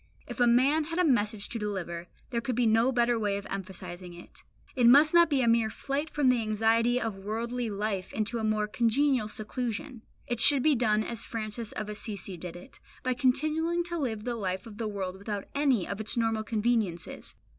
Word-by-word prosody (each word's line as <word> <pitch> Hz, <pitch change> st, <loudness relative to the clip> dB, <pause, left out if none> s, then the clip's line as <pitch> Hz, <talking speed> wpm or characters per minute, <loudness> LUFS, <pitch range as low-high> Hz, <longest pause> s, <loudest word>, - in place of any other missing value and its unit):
If -, -, -8 dB
a 245 Hz, -, +5 dB
man 270 Hz, +6 st, +4 dB
had 330 Hz, +2 st, -5 dB
a 360 Hz, -, +3 dB
message 215 Hz, -7 st, +1 dB
to 230 Hz, -, -3 dB
deliver, 175 Hz, -5 st, -4 dB, 0.2 s
there 235 Hz, -1 st, -1 dB
could 240 Hz, +1 st, -2 dB
be 245 Hz, 0 st, +2 dB
no 225 Hz, +3 st, +4 dB
better 240 Hz, -2 st, +2 dB
way 205 Hz, -2 st, 0 dB
of 200 Hz, -, -7 dB
emphasizing 185 Hz, -2 st, -7 dB
it. 175 Hz, -, -14 dB, 0.3 s
It 245 Hz, -3 st, +4 dB
must 290 Hz, +6 st, +7 dB
not 340 Hz, -1 st, +6 dB
be 280 Hz, -3 st, +2 dB
a -, -, +1 dB
mere 230 Hz, -1 st, +3 dB
flight 280 Hz, +7 st, -3 dB
from 290 Hz, -4 st, +2 dB
the 250 Hz, -2 st, +3 dB
anxiety 225 Hz, +3 st, +2 dB
of 225 Hz, -5 st, -3 dB
worldly 230 Hz, +3 st, -3 dB
life 200 Hz, -2 st, -3 dB
into 220 Hz, +2 st, -2 dB
a -, -, -3 dB
more 215 Hz, -1 st, +1 dB
congenial 240 Hz, +2 st, +2 dB
seclusion. 235 Hz, +4 st, -4 dB, 0.2 s
It 240 Hz, -1 st, -3 dB
should 275 Hz, +1 st, +6 dB
be 310 Hz, -, +5 dB
done 215 Hz, -4 st, +2 dB
as 235 Hz, -1 st, -5 dB
Francis 220 Hz, 0 st, -5 dB
of 215 Hz, -, -4 dB
Assisi 210 Hz, -2 st, -5 dB
did 175 Hz, 0 st, -8 dB
it, 175 Hz, -, -13 dB, 0.2 s
by 255 Hz, -, +1 dB
continuing 310 Hz, +7 st, +1 dB
to 345 Hz, 0 st, -4 dB
live 225 Hz, -7 st, -2 dB
the 245 Hz, +1 st, -2 dB
life 190 Hz, -4 st, -3 dB
of 220 Hz, -1 st, -11 dB
the 225 Hz, -, -1 dB
world 190 Hz, -3 st, -4 dB
without 200 Hz, 0 st, -5 dB
any 270 Hz, -9 st, +2 dB
of 200 Hz, +2 st, -4 dB
its 215 Hz, +2 st, 0 dB
normal 225 Hz, -1 st, +1 dB
conveniences. 215 Hz, -5 st, -1 dB
225 Hz, 205 wpm, -29 LUFS, 210-250 Hz, 0.3 s, must